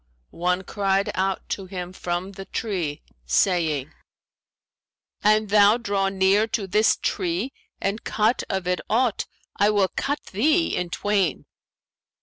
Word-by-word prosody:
one 180 +2 0
cried 195 +1 0
out 190 0 -1
to 195 -2 -4
him 180 -1 -6
from 180 +1 -3
the 195 0 -9
tree, 180 -11 -3 0.2
saying, 155 - +1 1.3
'An 215 +1 +4
thou 205 +1 +5
draw 200 -4 0
near 195 +3 +3
to 215 -2 -2
this 210 +4 +3
tree 185 +8 -1 0.3
and 200 +3 -2
cut 220 +3 +1
of 190 -2 -2
it 180 0 0
aught, 235 -1 +1 0.3
I 205 +1 +4
will 200 -3 +2
cut 285 +2 -1
thee 310 - +2
in 180 -1 -2
twain.' 200 -1 0
195 Hz, 135 wpm, -24 LUFS, 180-210 Hz, 1.3 s, thou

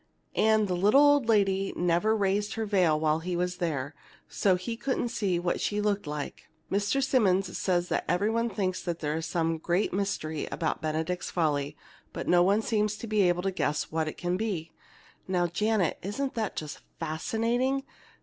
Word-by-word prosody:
And 220 -1 +3
the 180 - -1
little 205 +9 +5
old 290 -5 +4
lady 195 -3 +2
never 180 +5 +2
raised 205 +1 0
her 225 -1 -2
veil 180 -7 +3
while 155 0 +2
he 175 +2 -3
was 180 +1 -1
there, 150 -5 -2 0.3
so 190 -2 +2
he 205 +6 -4
couldn't 240 0 -1
see 200 -6 0
what 175 0 -1
she 210 - 0
looked 205 -4 0
like. 150 -1 -6 0.2
"Mr. 205 +7 +1
Simmonds 195 -8 +2
says 180 -2 0 0.2
every 200 +5 +2
one 230 +1 0
thinks 190 -3 -2
there 165 -4 -2
is 160 0 -3
some 165 -1 0
great 175 +4 0
mystery 180 -6 -2
about 160 -3 -2
'Benedict's 160 +3 -2
Folly,' 150 -3 0 0.4
but - - -5
no 175 0 +5
one 200 +5 +3
seems 210 -2 0
to 230 - -7
be 215 -2 +1
able 175 0 0
to 195 - 0
guess 150 -5 -1
what 160 0 0
it 155 - -5
can 175 +1 -1
be. 185 -7 -3 0.6
Now, 180 -2 +1
Janet, 195 +1 0
isn't 260 +8 -3
that 220 -4 -2
just 150 -1 -5 0.2
fascinating? 230 - 0
185 Hz, 180 wpm, -28 LUFS, 165-215 Hz, 0.6 s, little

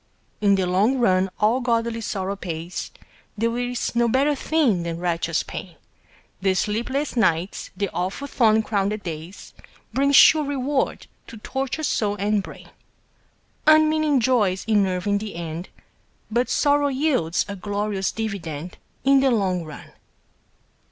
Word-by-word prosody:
In 200 -1 +4
the 190 -1 0
long 200 +9 +2
run 190 -5 +2
all 225 +5 +2
godly 230 -1 0
sorrow 195 -2 -3
pays, 170 -2 -5 0.5
There 230 +2 0
is 245 0 -2
no 235 0 +3
better 275 +5 +2
thing 275 - +1
than 170 -1 -4
righteous 170 -2 -1
pain, 175 -3 -8 0.7
The 190 -1 +2
sleepless 240 +10 -1
nights, 180 -5 0
the 200 - 0
awful 190 +10 -3
thorn 220 -5 +3
crowned 205 0 -1
days, 165 +3 -8 0.4
Bring 280 +1 +2
sure 305 +2 +7
reward 280 -1 -1 0.2
to 225 - -10
tortured 270 +7 -3
soul 205 -6 0
and 205 +1 0
brain. - - -12 1.0
Unmeaning 310 -2 +4
joys 215 -7 +1
enervate 195 -4 +1
in 200 - +3
the 215 -3 -7
end, 170 +1 -6 0.6
But 240 +3 +1
sorrow 290 0 +2
yields 260 - 0
a 200 - -5
glorious 205 0 -2
dividend 180 -7 -5 0.2
In 275 0 +5
the 270 0 +3
long 190 -7 0
run. 155 -2 -11
210 Hz, 140 wpm, -23 LUFS, 185-260 Hz, 1.0 s, sure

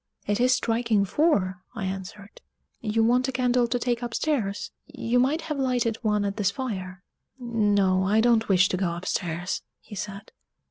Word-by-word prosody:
"It 205 +2 0
is 250 +1 +4
striking 230 -4 +2
four," 190 - +1
I 210 -4 -3
answered; 195 +2 -7 0.4
"you 225 0 +1
want 250 +3 +3
a - - -1
candle 250 -1 +2
to 245 - 0
take 240 0 -1
upstairs 235 -4 -2 0.2
you 240 +2 0
might 280 +6 +2
have 305 -3 -4
lighted 245 -4 +1
one 210 -2 0
at 200 0 -3
this 200 -3 +2
fire." 195 -5 -5 0.3
"No, 205 -6 +2
I 205 +3 +3
don't 225 -1 +3
wish 185 -1 +5
to 185 - -1
go 175 -3 -1
upstairs," 175 0 -2 0.2
he - - -14
said. 200 +1 -6
220 Hz, 170 wpm, -26 LUFS, 195-245 Hz, 0.4 s, wish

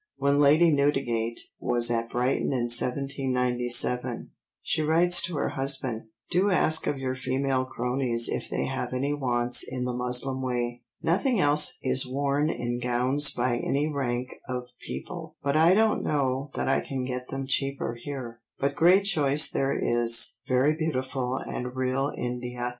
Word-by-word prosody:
When 140 +1 +2
Lady 155 +4 +5
Newdigate 135 -6 0 0.2
was 120 0 +1
at 115 0 -1
Brighton 125 +4 0
in 120 -3 -1
1797 125 -2 0 0.3
she - - 0
writes 170 +3 +4
to 175 - -2
her 145 - -1
husband: 135 -4 -1 0.3
"Do 185 +3 +2
ask 160 -4 +3
of 145 - -1
your 130 -1 -3
female 130 +1 -1
croneys 125 -1 -1
if - - -4
they - - -2
have - - -4
any 140 +3 -1
wants 125 -3 0
in 125 -1 -4
the 125 - -2
muslin 125 +2 -1
way. 120 -1 -3 0.2
Nothing 205 +8 +1
else 150 -2 +3
is 130 0 +1
worn 140 +3 0
in 120 -3 -3
gowns 125 +4 +3
by 120 0 0
any 140 +4 -1
rank 130 -4 -3 0.2
of 125 -1 -3 0.2
people, 160 -3 -7
but 140 +1 0
I 165 +4 +5
don't 220 +1 +2
know 135 -1 -1
that - - -2
I - - +2
can 130 -2 -4
get 125 0 -5
them 135 0 -5
cheaper 135 -2 -1
here, 120 -2 -7 0.2
but 140 +1 -1
great 180 +6 +4
choice 150 -6 +3
there 135 0 0
is, 120 0 +3
very 130 +4 +3
beautiful 130 -5 -2
and 125 -1 -5
real 130 +2 -1
India." 125 0 -4
130 Hz, 160 wpm, -26 LUFS, 125-145 Hz, 0.3 s, Lady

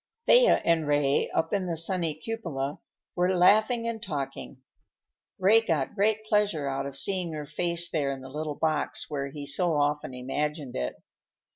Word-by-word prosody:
Thea - - +5
and 165 -2 +2
Ray, 145 -1 +2
up 160 +3 -1
in 195 -3 0
the 170 -2 -2
sunny 165 -2 -1
cupola, 155 -8 -4 0.4
were 180 +1 +2
laughing 220 +6 +4
and 225 -1 -3
talking. 140 - -5 0.8
Ray 205 +4 +5
got 160 -10 -1
great 215 +1 +1
pleasure 205 -9 +1
out 135 0 -2
of 140 -1 -7
seeing 180 -1 0
her 150 -1 -5
face 170 +3 -1
there 145 -4 0
in 135 -1 -6
the 130 - -9
little 150 +1 -4
box 155 -1 -1
where 140 -2 -2
he 145 +1 -7
so 165 +3 0
often 145 -2 0
imagined 145 +2 -3
it. 60 -1 -2
155 Hz, 165 wpm, -27 LUFS, 145-190 Hz, 0.8 s, Thea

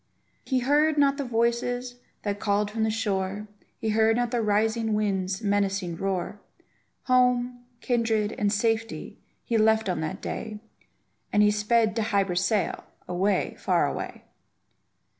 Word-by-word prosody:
He 260 -2 0
heard 300 +4 +3
not 280 -1 +3
the 285 - -2
voices 245 +1 -1 0.3
that 205 -1 -2
called 205 0 0
from 220 +1 -3
the 220 - +2
shore 205 -2 -2 0.3
He 220 - -2
heard 220 +1 +3
not 240 0 0
the 240 -2 +1
rising 220 +1 +1
wind's 195 -1 -1
menacing 200 -3 0
roar; 195 +2 -3 0.6
Home, 250 -1 +2 0.2
kindred, 225 -3 +1
and 205 -1 0
safety, 225 +1 -1 0.2
he 230 -2 0
left 220 0 +3
on 180 -3 -1
that 155 - -4
day, 215 -2 -5 0.7
And 210 - +4
he 210 - +5
sped 215 +1 +2
to - - +2
Hy 205 -2 +2
Brasail, 195 +2 0 0.2
away, 185 +2 0
far - - +2
away! - - -5
220 Hz, 140 wpm, -26 LUFS, 205-235 Hz, 0.7 s, he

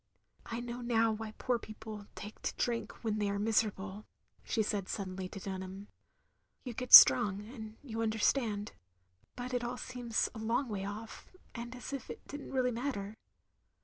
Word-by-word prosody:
"I 230 +1 -3
know 240 0 -5
now 230 -2 +3
why 215 0 -5
poor 250 -2 0
people 215 -1 -9
take 210 +2 -9
to - - -2
drink 235 0 -2
when 215 -2 0
they 205 -1 +1
are 200 - -1
miserable, 210 -1 0 0.2
" - - -37
she 220 - 0
said 205 -3 -2
suddenly 185 -2 -4
to 195 - -7
Dunham. 190 +1 -6 0.7
"You 250 - -5
get 250 +2 -5
strong, 195 +10 +10
and 220 -3 -9
you 225 -5 -4
understand. 220 -1 +1 0.6
But 250 +1 -5
it 245 -1 0
all 245 +1 -3
seems 245 -3 -1
a 220 - -7
long 230 +4 0
way 195 -2 -3
off, 215 +3 -7 0.2
and 235 +1 -6
as 250 +2 -7
if 275 - -5
it - - -9
did 290 +1 -6
n't - - -9
really 255 -2 +2
matter. 225 -4 -3
220 Hz, 180 wpm, -33 LUFS, 205-240 Hz, 0.7 s, strong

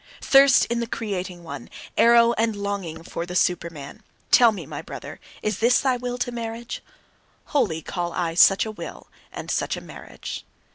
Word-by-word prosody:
Thirst 275 -1 +6
in 235 0 -2
the 235 - -2
creating 190 -6 -4
one, 145 -6 -8 0.3
arrow 235 0 +6
and 225 -1 0
longing 200 -5 -4
for 170 +1 -5
the 180 - -6
Superman: 170 -1 -1 0.3
tell 240 -2 +7
me, 210 - -7
my - - -6
brother, - - -9 0.2
is 210 -3 -1
this 240 +2 +4
thy 260 -2 +2
will 245 0 -4
to 245 0 -2
marriage? 230 0 -5 0.7
Holy 195 - +1
call 175 -2 -3
I 170 -1 -2
such 195 +4 +6
a 220 - -4
will, 215 - -9 0.2
and - - -6
such - - -1
a - - -4
marriage. - - -8
215 Hz, 175 wpm, -24 LUFS, 175-235 Hz, 0.7 s, tell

